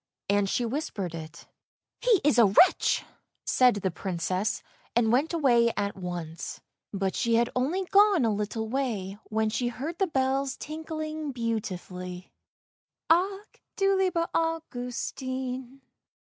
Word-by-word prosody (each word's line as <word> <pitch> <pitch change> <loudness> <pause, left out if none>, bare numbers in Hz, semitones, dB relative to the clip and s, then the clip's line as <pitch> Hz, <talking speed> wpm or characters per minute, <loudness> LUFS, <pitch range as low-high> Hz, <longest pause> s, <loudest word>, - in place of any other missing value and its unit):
And 200 -1 +2
she 240 - 0
whispered 220 - -3
it. 160 0 -8 0.3
" - - -57
He 470 -6 +4
is 285 -4 +4
a 225 - +8
wretch! 325 - +4 0.2
" - - -51
said 250 -2 +4
the 190 -2 -1
Princess, 185 +3 -2 0.3
and 230 -2 +3
went 275 +7 +2
away 245 -8 +4
at 200 0 -1
once. 175 -3 -5 0.3
But 195 -1 -1
she 235 -2 +2
had 235 +1 +2
only 315 +10 0
gone 395 - +5
a 220 - +2
little 210 +2 -2
way 220 -6 -2
when 220 0 0
she 240 +2 0
heard 285 +8 -5
the 385 - +3
bells 270 -2 0
tinkling 310 -1 -5
beautifully: 185 -6 -4 0.4
" - - -67
Ach 390 +4 +1
du 390 0 +3
lieber 365 -3 +1
Augustin." 260 -4 -3
245 Hz, 140 wpm, -28 LUFS, 205-310 Hz, 0.4 s, a